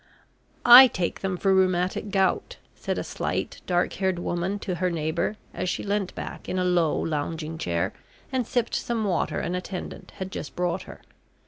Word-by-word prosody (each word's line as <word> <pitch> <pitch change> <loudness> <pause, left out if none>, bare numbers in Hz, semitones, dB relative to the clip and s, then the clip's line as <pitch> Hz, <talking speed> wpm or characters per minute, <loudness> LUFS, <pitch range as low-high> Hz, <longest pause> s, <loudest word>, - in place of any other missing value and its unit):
"I 250 +2 +12
take 180 -7 -2
them 190 -2 -2
for 195 +1 +2
rheumatic 185 +1 +1
gout," 190 -2 0 0.2
said - - -3
a - - -2
slight, - - -3
dark 175 -1 +1
haired 190 -2 0
woman 175 +3 -2
to 200 -2 -4
her 185 - +2
neighbour, 165 +4 -1 0.2
as 180 +1 -2
she - - -2
leant 200 -2 -1
back - - -7
in 185 - -1
a 185 - +1
low 175 -4 +2
lounging 160 +1 -3
chair, 85 - -1 0.4
and 255 -3 -1
sipped 240 -2 -1
some 235 -2 -1
water 190 -5 0
an 175 - -2
attendant 180 0 -6
had 190 0 -6
just 150 - -6
brought 180 +1 -1
her. - - -11
180 Hz, 180 wpm, -26 LUFS, 170-195 Hz, 0.4 s, I